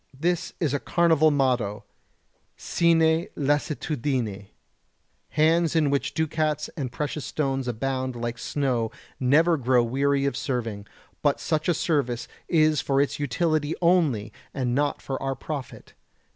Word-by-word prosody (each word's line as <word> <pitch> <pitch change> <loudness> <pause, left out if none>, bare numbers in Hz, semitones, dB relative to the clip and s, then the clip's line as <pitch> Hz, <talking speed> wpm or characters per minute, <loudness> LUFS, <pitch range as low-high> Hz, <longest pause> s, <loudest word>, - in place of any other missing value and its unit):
This 175 +2 0
is 155 -6 0
a 145 - +1
carnival 160 -2 +3
motto: 125 -8 0 0.7
"Sine 165 -1 +2
lassitudine." 135 - -1 0.8
Hands 160 +1 +2
in 150 -3 +3
which 140 - -1
ducats 155 -1 0
and 135 -7 -4
precious 150 +2 -3
stones 135 -3 -2
abound 130 +2 -2
like 120 0 -4
snow 125 -6 -1 0.3
never 160 +6 +4
grow 125 -2 +3
weary 140 +3 +1
of 140 - 0
serving, 115 -5 -3 0.3
but 145 -2 +2
such 155 +1 -1
a 175 - +3
service 125 -8 0 0.2
is 155 -3 +3
for 135 -1 +1
its 140 +1 0
utility 155 0 0
only 155 - +2 0.2
and 125 -3 -1
not 145 +3 0
for 135 - -4
our 135 0 -1
profit. 145 -3 -7
140 Hz, 130 wpm, -25 LUFS, 125-155 Hz, 0.8 s, never